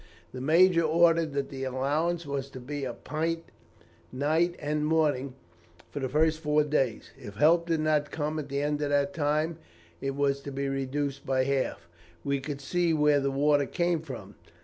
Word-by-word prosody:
"The 130 - -7
major 170 +4 +5
ordered 165 0 +3
that 140 -1 -2
the 135 -1 -6
allowance 150 +6 -1
was 140 -1 -3
to 130 - -9
be 140 +2 -5
a 125 - -4
pint 165 +5 -3 0.7
night 160 +6 +1
and 150 0 -2
morning 150 -4 +1 0.6
for 145 - -4
the 130 -2 -2
first 155 +3 +2
four 150 -1 +2
days. 135 -6 -1
If 100 - -9
help 165 +8 +4
did 165 -2 +1
not 150 -1 +1
come 155 +1 -2
at 145 -2 -6
the 140 +1 -1
end 150 0 -1
of 145 - 0
that 145 +6 +1
time, 155 +1 0 0.4
it 135 0 -2
was 140 -1 +1
to 140 0 -7
be 140 +1 -2
reduced 135 +1 -2
by 130 -1 +1
half. 130 -10 -1 0.4
We 140 0 0
could 140 +1 -6
see 170 +3 +1
where 150 -1 +4
the 140 0 0
water 145 +1 +2
came 170 -2 0
from. 110 -10 -9
145 Hz, 185 wpm, -28 LUFS, 135-160 Hz, 0.7 s, major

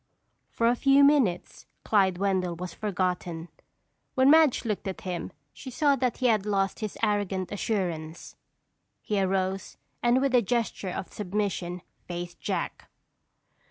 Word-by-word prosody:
For 230 - -1
a 240 +1 +4
few 275 +2 +5
minutes 270 -12 +2 0.2
Clyde 190 -4 +3
Wendell 185 -2 0
was 180 0 -6
forgotten. 180 -4 -2 0.7
When 260 +2 +5
Madge 310 -6 +5
looked 210 -3 -2
at 190 - -5
him 180 -1 -4 0.2
she 265 - -9
saw 280 +3 +2
that 255 -2 -1
he 255 - -2
had 220 -5 +3
lost 195 -2 0
his 215 -2 -5
arrogant 200 -3 0
assurance. 175 -7 -3 0.7
He 205 -2 0
arose 190 0 -1 0.2
and 240 +1 +3
with 270 -1 0
a 245 - +6
gesture 230 -3 -1
of 180 - -6
submission 185 -3 -3 0.2
faced 175 0 -6
Jack. - - -4
200 Hz, 140 wpm, -27 LUFS, 180-240 Hz, 0.7 s, a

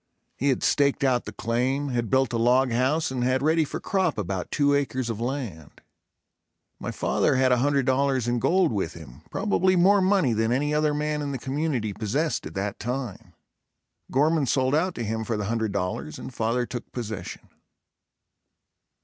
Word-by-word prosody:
He 140 - 0
had 130 - 0
staked 140 -1 +2
out 125 -3 +2
the 105 - -6
claim, 125 +6 -1
had 120 -3 -1
built 130 -2 +2
a 115 - 0
log 125 +2 +3
house 130 +6 +1
and 125 -2 -2
had 130 +2 +1
ready 160 +1 +3
for 150 - -5
crop 185 - 0
about 95 -3 -3
two 145 -1 +2
acres 130 -4 0
of 115 0 -5
land. 120 - -5 1.0
My - - -4
father - - +1
had 130 0 +3
$100.00 130 -1 +2
in 120 0 +1
gold 175 +6 +3
with 95 -5 -2
him, 75 -4 -12
probably 190 -2 +1
more 195 +3 +5
money 185 - +3
than 110 +1 +1
any 145 +4 +1
other 150 0 +2
man 150 0 -1
in 145 -1 -3
the - - -2
community 130 -5 -2
possessed 120 - -1
at 80 - -11
that 100 +1 -3
time. 125 -4 -5 0.8
Gorman 150 +1 +2
sold 130 +2 +1
out 175 +4 +1
to 120 - -3
him 110 +1 -2
for 110 0 -2
the 105 - -2
$100.00 100 -8 -2
and - - -8
father 115 +2 0
took 120 0 -7
possession. 110 -4 -6
130 Hz, 175 wpm, -25 LUFS, 115-145 Hz, 1.0 s, more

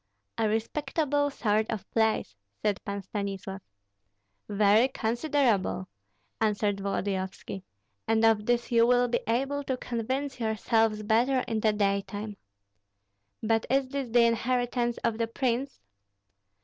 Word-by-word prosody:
"A 220 -1 +2
respectable 285 +6 0
sort 215 -5 0
of 220 -3 -4
place," 220 - +1 0.3
said 205 -2 0
Pan 200 0 -4
Stanislav. 195 -1 -5 0.9
"Very 210 +3 +4
considerable," 235 -6 0 0.5
answered 210 -2 +1
Volodyovski; 195 -1 -3 0.5
"and 225 0 +3
of 215 -2 +3
this 240 0 +1
you 230 0 +5
will 245 0 +4
be 240 - +1
able 275 +5 0
to 260 -1 -1
convince 255 +4 -3
yourselves 220 -1 +1
better 240 +5 +3
in 225 -1 -1
the 215 0 +3
daytime." 205 0 -1 1.1
"But 225 0 +1
is 270 0 +2
this 275 -2 -3
the 235 0 +5
inheritance 240 0 0
of 230 -1 0
the 230 - +1
prince?" 255 +3 -2
225 Hz, 125 wpm, -28 LUFS, 210-250 Hz, 1.1 s, you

